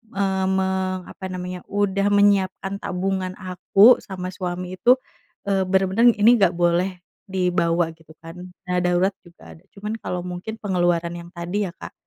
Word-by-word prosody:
eee, 190 -1 0
me 190 0 +1 0.4
apa 190 - -9
namanya, 180 0 -5
udah 200 -1 +1
menyiapkan 200 -1 +2
tabungan 185 0 -2
aku 195 +5 +4
sama 185 -2 -6
suami 180 0 -5
itu, 250 +1 +6 0.5
eee, 195 -1 +2
bener-bener 195 +5 +3
ini 235 +3 +6
nggak 190 -3 +4
boleh 175 +2 +1 0.3
dibawa, 175 -2 +1
gitu 160 -1 -19
kan. 165 +1 -11 0.3
Dana 180 0 +1
darurat 180 +2 +2
juga 175 -1 -15
ada, 160 - -19
cuman 210 +2 -5
kalau 180 0 -3
mungkin 180 +5 -6
pengeluaran 175 -3 0
yang 170 0 -9
tadi, 180 +4 -2
ya - - -7
Kak, - - -9
185 Hz, 155 wpm, -22 LUFS, 175-195 Hz, 0.5 s, itu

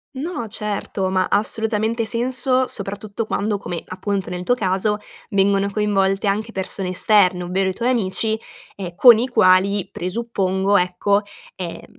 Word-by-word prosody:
No, 285 -3 -4
certo. 205 -2 -3
Ma 185 -1 +1
ha - - +4
assolutamente 220 +1 0
senso, 255 +3 +1
soprattutto 205 +1 -4
quando 205 -1 -1
come, 175 -3 -5
appunto, 190 0 -3
nel 180 0 -4
tuo 245 +7 +2
caso 200 -1 0 0.3
vengono 200 0 +2
coinvolte 195 -1 0
anche 210 +3 -1
persone 190 -1 -2
esterne, 185 -1 +3
ovvero 190 +2 0
i - - -3
tuoi 235 +6 -1
amici, 220 -1 +1 0.4
ehm, 180 -3 -7
con 230 +2 +8
i 245 - 0
quali, 200 -4 +3
presuppongo, 195 0 0
ecco, 180 +3 +1 0.3
ehm, 175 -3 -7
200 Hz, 145 wpm, -20 LUFS, 190-220 Hz, 0.4 s, con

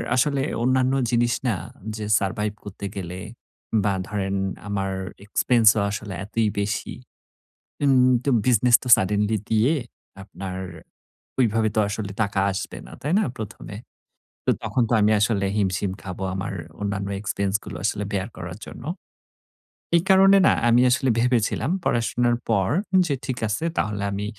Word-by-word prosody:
আসলে 140 +1 +2 0.2
অন্যান্য 130 +1 +2 0.2
জিনিস 120 -1 +2
না 110 - +2 0.4
যে, 110 -1 -5
সারভাইভ 105 +2 -1
করতে 100 0 -8
গেলে 90 -1 -5 0.6
বা 100 -2 +2 0.2
ধরেন 100 -2 -2 0.3
আমার 100 -1 -2 0.3
এক্সপেন্সও 110 0 +4
আসলে 105 -1 -5
এতই 110 +1 0
বেশি। 100 0 -2 0.9
উম 130 -2 +5
তো 140 - 0 0.2
বিজনেস 125 -1 +5
তো - - -7
সাডেনলি 105 +3 +1
দিয়ে 115 +7 +3 0.5
আপনার 95 -1 -7 0.8
ঐভাবে 110 -3 +2
তো - - +3
আসলে 100 -1 -4
টাকা 100 -1 0
আসবে 95 +1 -5
না, - - -13
তাই 150 +4 -1
না? - - +2
১ম 110 -3 -7
এ - - -6 0.7
তো, - - +4
তখন 125 - +1
তো, - - -2
আমি 105 +1 +4
আসলে 105 -2 +1
হিমশিম 95 -1 0
খাবো 95 0 -6
আমার 95 +1 -4 0.3
অন্যান্য 100 -1 -2
এক্সপেন্স 100 -1 -2
গুলো - - -7
আসলে 105 -1 0
বেয়ার 95 +1 -1
করার 90 +4 -7
জন্য। - - -10 1.1
এই 170 - +5
কারণে 195 +1 +7
না, - - +5 0.2
আমি 120 +1 +5
আসলে 130 +1 +2
ভেবেছিলাম 125 +3 +1
পড়াশোনার 120 +1 +1
পর 95 -4 +2 0.4
যে, 145 - 0
ঠিক 130 -3 -3
আছে 105 +10 -2
তাহলে 105 -1 -1
আমি 100 +1 -3
105 Hz, 150 wpm, -24 LUFS, 100-120 Hz, 1.1 s, কারণে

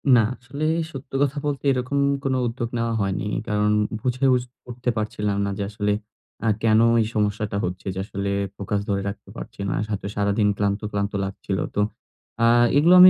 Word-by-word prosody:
না - - +7 0.2
আসলে 140 +5 -6 0.3
সত্য 135 -2 -9
কথা 145 +1 0
বলতে 145 -2 -1
এরকম 130 +2 -1 0.3
কোনো 130 -1 +1
উদ্যোগ 120 0 -3
নেওয়া 115 0 0
হয়নি। 95 0 -1 0.2
কারণ 105 0 +2 0.3
বুঝে 125 +2 0
উস 125 - 0 0.3
উঠতে 125 +1 -2
পারছিলাম 105 -1 -1
না - - -1
যে 100 - -1
আসলে 105 -1 0 0.5
আ - - +3
কেনো 115 0 +5 0.2
এই 110 - +1
সমস্যাটা 105 -1 0
হচ্ছে 90 +2 -5
যে 95 - -4
আসলে 100 -1 -3 0.3
ফোকাস 100 +1 -1
ধরে 100 -1 +1
রাখতে 100 -1 -9
পারছি 115 -2 -9
না। - - 0 0.2
হয়তো 100 -1 -2
সারাদিন 100 +1 +2
ক্লান্ত, 100 0 +1
ক্লান্ত 100 0 -1
লাগছিলো 95 0 -3
তো 105 - +3 0.6
আ - - +6 0.3
এগুলো 165 +5 +6
আমি 185 0 +12
105 Hz, 180 wpm, -24 LUFS, 100-125 Hz, 0.6 s, আমি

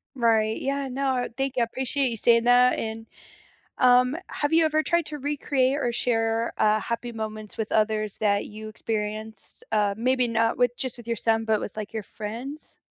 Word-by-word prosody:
Right, 225 -3 +2
yeah, 275 0 -1
no, 260 -1 0
thank 270 0 -1
you, 250 - +1
I 235 - +4
appreciate 265 +2 -1
you 230 - -4
saying 230 +1 +4
that, 245 +1 +5
and, 225 0 -4 0.7
um, 250 +3 +5
have 290 +2 -2
you 325 0 +5
ever 310 0 +2
tried 340 -1 +1
to 300 -1 -6
recreate 280 -1 0
or 240 -4 0
share, 225 -1 0
uh, 215 0 +3
happy 235 +2 -4
moments 215 -1 -6
with 220 -2 -3
others 215 -1 +1
that 205 -1 +1
you 215 +1 -8
experienced? 215 0 -4
Uh, 205 -2 +2
maybe 250 +1 +2
not 230 +1 +1
with 245 -1 +2
just 260 -1 -4
with 235 - -12
your 230 -1 -1
son, 225 0 +1
but 220 -1 +2
with, 210 - -6
like, 215 0 -5
your 220 -2 -3
friends? 235 +10 -7
230 Hz, 190 wpm, -25 LUFS, 220-260 Hz, 0.7 s, that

